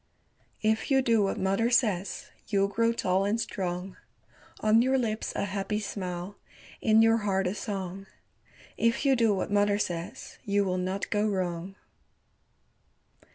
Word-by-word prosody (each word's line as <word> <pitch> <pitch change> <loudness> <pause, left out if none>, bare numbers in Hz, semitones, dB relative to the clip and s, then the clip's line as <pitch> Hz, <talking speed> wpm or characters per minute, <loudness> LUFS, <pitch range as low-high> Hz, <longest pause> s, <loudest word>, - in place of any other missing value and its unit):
If 220 +1 +1
you 270 -1 +4
do 230 -3 +3
what 195 - 0
mother 195 +5 +1
says 205 -7 0 0.2
You'll 200 -1 +2
grow 230 +3 +2
tall 190 -4 +1
and 205 +3 0
strong. 185 -3 -4 0.6
On 215 +1 +5
your 260 +2 +2
lips 220 -3 -2
a - - 0
happy 200 +1 -2
smile, 185 -2 -5 0.4
In 220 0 +5
your 225 0 +5
heart 195 -3 0
a 180 - 0
song 195 -2 -5 0.7
If 230 +4 +1
you 270 -1 +5
do 230 -3 +3
what 190 - -3
mother 205 0 +3
says 175 -4 -5
You 200 0 +1
will 185 -1 -1
not 185 +2 -3
go 210 +1 +2
wrong. 185 -1 -3
205 Hz, 150 wpm, -28 LUFS, 190-225 Hz, 0.7 s, On